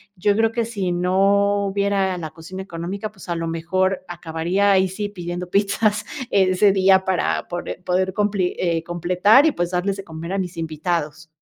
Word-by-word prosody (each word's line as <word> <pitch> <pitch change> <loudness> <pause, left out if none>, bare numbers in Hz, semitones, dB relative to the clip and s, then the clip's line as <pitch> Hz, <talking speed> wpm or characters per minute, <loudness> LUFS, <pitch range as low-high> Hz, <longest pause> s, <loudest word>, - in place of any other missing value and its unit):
yo 200 +2 +1
creo 225 0 +3
que 235 - 0
si 200 -6 -2
no 200 +3 +2
hubiera 195 -1 0
la 160 -2 -5
cocina 165 +4 -9
económica, 190 +4 -5
pues 195 -3 -14
a 170 - 0
lo 165 0 -3
mejor 185 +4 -1
acabaría 175 +4 0
ahí 190 -1 +4
sí 205 +2 -4
pidiendo 175 -2 -6
pizzas 210 +1 +1 0.3
ese 190 +1 +4
día 190 0 +4
para 190 -1 0
pore 175 0 -4
poder 185 +1 0
compli, 200 -3 0
eh, 170 -2 0
completar 180 - +4
y, 320 - +4
pues, 175 -7 -2
darles 190 +2 -1
de 195 - -7
comer 165 +2 -6
a 195 - 0
mis 180 -2 -4
invitados. 160 -1 -3
185 Hz, 180 wpm, -21 LUFS, 175-200 Hz, 0.3 s, ahí